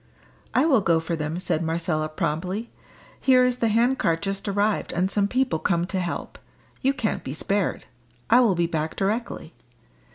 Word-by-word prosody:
"I -, -, +4 dB
will 265 Hz, -9 st, +4 dB
go 170 Hz, -3 st, +3 dB
for 165 Hz, +1 st, -3 dB
them," 155 Hz, +1 st, -3 dB
said 175 Hz, -3 st, -1 dB
Marcella 160 Hz, -1 st, -1 dB
promptly. 180 Hz, +9 st, -3 dB, 0.5 s
"Here 255 Hz, -1 st, +5 dB
is 250 Hz, 0 st, +1 dB
the 235 Hz, -, +1 dB
hand 235 Hz, +4 st, +2 dB
cart 165 Hz, +1 st, +1 dB
just 195 Hz, 0 st, -3 dB
arrived 205 Hz, +1 st, 0 dB
and 185 Hz, +3 st, 0 dB
some 200 Hz, -1 st, +1 dB
people 250 Hz, -6 st, 0 dB
come 170 Hz, -1 st, +1 dB
to 190 Hz, +1 st, -3 dB
help; 175 Hz, -2 st, -4 dB, 0.4 s
you 270 Hz, -, +3 dB
can't 255 Hz, -6 st, -2 dB
be 135 Hz, -, -5 dB
spared. 200 Hz, +5 st, -1 dB, 0.4 s
I 240 Hz, -, +6 dB
will 225 Hz, -7 st, +4 dB
be 170 Hz, 0 st, +1 dB
back 160 Hz, -1 st, -2 dB
directly." 200 Hz, -4 st, -2 dB
195 Hz, 175 wpm, -24 LUFS, 165-230 Hz, 0.5 s, I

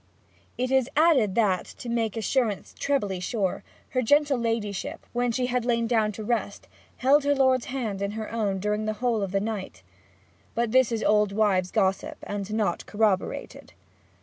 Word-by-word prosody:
It 255 Hz, +1 st, -1 dB
is 265 Hz, -1 st, +3 dB
added 285 Hz, -, +4 dB
that, 200 Hz, -6 st, +2 dB
to 245 Hz, -, -8 dB
make 230 Hz, -2 st, -1 dB
assurance 225 Hz, -2 st, -1 dB
trebly 205 Hz, -10 st, 0 dB
sure, 195 Hz, 0 st, -2 dB, 0.3 s
her 255 Hz, -, 0 dB
gentle 290 Hz, +2 st, +3 dB
ladyship, 225 Hz, -4 st, -3 dB
when 245 Hz, 0 st, +1 dB
she 250 Hz, +2 st, 0 dB
had 250 Hz, -1 st, 0 dB
lain 235 Hz, -1 st, +1 dB
down 220 Hz, -2 st, +2 dB
to 215 Hz, -, -7 dB
rest, 210 Hz, -3 st, -2 dB, 0.3 s
held 275 Hz, +3 st, +4 dB
her 285 Hz, 0 st, +2 dB
lord's 260 Hz, -2 st, +3 dB
hand 225 Hz, -7 st, -3 dB
in 200 Hz, +1 st, -2 dB
her 220 Hz, -1 st, -5 dB
own 210 Hz, -4 st, -1 dB
during 210 Hz, +2 st, -1 dB
the 215 Hz, -, -1 dB
whole 235 Hz, -2 st, 0 dB
of 195 Hz, -2 st, -2 dB
the 195 Hz, -, +1 dB
night. 195 Hz, -, -5 dB, 0.7 s
But 235 Hz, -1 st, 0 dB
this 260 Hz, -1 st, +4 dB
is 225 Hz, -1 st, -1 dB
old 210 Hz, -1 st, +3 dB
wives' 195 Hz, -4 st, +2 dB
gossip, 195 Hz, -2 st, 0 dB
and 205 Hz, 0 st, -5 dB
not 210 Hz, -5 st, -1 dB
corroborated. 205 Hz, -3 st, -1 dB
220 Hz, 175 wpm, -26 LUFS, 205-245 Hz, 0.7 s, added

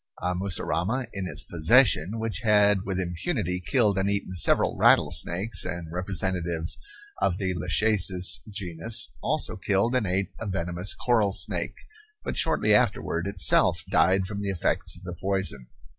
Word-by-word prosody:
A 90 Hz, -, -1 dB
mussurama 95 Hz, -, -2 dB
in 95 Hz, -2 st, -4 dB
his -, -, -2 dB
possession, 95 Hz, -, +3 dB
which 110 Hz, -1 st, -3 dB
had 105 Hz, -3 st, +3 dB
with 95 Hz, -1 st, -2 dB
impunity 90 Hz, -, -2 dB
killed 105 Hz, -2 st, +2 dB
and 95 Hz, +1 st, 0 dB
eaten 100 Hz, -2 st, -2 dB
several 85 Hz, -, +3 dB
rattlesnakes 95 Hz, +6 st, +2 dB
and 85 Hz, -2 st, -5 dB
representatives 90 Hz, -3 st, -2 dB, 0.4 s
of 90 Hz, -2 st, +1 dB
the 95 Hz, -2 st, -2 dB
lachecis 90 Hz, +1 st, +1 dB
genus, 100 Hz, +2 st, -2 dB
also -, -, 0 dB
killed 100 Hz, +5 st, 0 dB
and 125 Hz, -5 st, +1 dB
ate 95 Hz, +1 st, -1 dB
a 110 Hz, -, -5 dB
venomous 90 Hz, 0 st, -2 dB
coral 110 Hz, -5 st, +1 dB
snake, -, -, 0 dB, 0.5 s
but -, -, -4 dB
shortly -, -, +2 dB
afterward 85 Hz, +3 st, +1 dB
itself 100 Hz, -2 st, +2 dB
died 95 Hz, +1 st, +3 dB
from 100 Hz, +1 st, -5 dB
the 100 Hz, -, -2 dB
effects 90 Hz, -1 st, -2 dB
of 90 Hz, -, -16 dB
the 90 Hz, -1 st, -6 dB
poison. 95 Hz, -7 st, -2 dB
95 Hz, 145 wpm, -26 LUFS, 90-105 Hz, 0.5 s, possession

